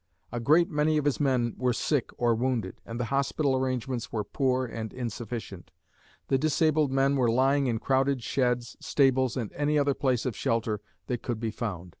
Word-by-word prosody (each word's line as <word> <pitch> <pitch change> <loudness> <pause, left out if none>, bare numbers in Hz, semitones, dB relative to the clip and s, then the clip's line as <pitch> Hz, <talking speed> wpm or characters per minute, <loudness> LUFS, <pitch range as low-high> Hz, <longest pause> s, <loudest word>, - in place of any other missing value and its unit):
A 120 - -3
great 155 +8 +4
many 150 +1 +2
of 150 - 0
his 145 - +1
men 130 -5 +1
were 125 -1 +2
sick 140 +1 0
or 120 -1 +3
wounded, 115 -4 -2
and 115 +1 -5
the 120 - 0
hospital 140 0 +1
arrangements 130 -2 -2
were 110 -2 -1
poor 130 +3 0
and 110 -2 -5
insufficient. 115 -6 -6 0.6
The 135 - +2
disabled 155 -1 +2
men 135 +1 +2
were 125 -3 +3
lying 135 +3 +3
in 115 -2 0
crowded 135 +1 +1
sheds, 125 -2 0
stables 130 -2 +2
and 115 -5 -4
any 150 +1 +1
other 140 -1 +3
places 130 -3 0
of 125 - -2
shelter 110 -2 -1 0.2
that 125 -2 -3
could 120 -3 -3
be 115 -1 -2
found. 95 -6 -5
130 Hz, 185 wpm, -28 LUFS, 115-140 Hz, 0.6 s, great